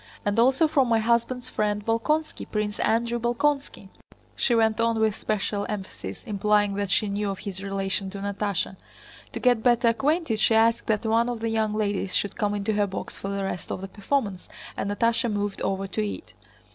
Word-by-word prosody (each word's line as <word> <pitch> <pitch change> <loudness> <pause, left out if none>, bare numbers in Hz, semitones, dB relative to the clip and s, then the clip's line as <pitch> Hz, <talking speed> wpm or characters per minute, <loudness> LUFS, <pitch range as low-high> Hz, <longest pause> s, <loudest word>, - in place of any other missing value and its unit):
And 205 +2 +1
also 265 +7 +4
from 275 -5 +2
my 230 - +4
husband's 235 +2 +1
friend 210 -3 -1
Bolkónski, 300 +8 0
Prince 210 -1 -2
Andrew 235 +2 +1
Bolkónski," 240 -3 -1 0.5
she 240 - +2
went 225 -1 +3
on 230 -1 +2
with 220 -2 +2
special 205 -1 -1
emphasis, 190 - -6
implying 205 0 +2
that 200 0 -2
she 210 - +2
knew 205 +1 -1
of 195 - -3
his 190 -1 -6
relation 195 0 -2
to 200 - -7
Natásha. 200 -1 -2 0.6
To - - -3
get 245 -3 +3
better 240 -1 +4
acquainted 275 0 +1
she 220 - +4
asked 230 +1 +3
that 220 0 0
one 230 +2 +2
of 240 -2 -3
the 225 0 -1
young 220 -1 0
ladies 205 -3 -1
should 205 - 0
come 205 -1 0
into 205 +1 -1
her 205 -1 +2
box 190 - -6
for 195 - -4
the 200 0 -2
rest 195 -2 -4
of - - -3
the 195 - -5
performance, 200 -2 -2 0.3
and 200 - -2
Natásha 230 +3 +1
moved 205 -1 -2
over 195 0 -1
to 215 +3 -2
it. 210 +9 -6
215 Hz, 195 wpm, -26 LUFS, 200-235 Hz, 0.6 s, also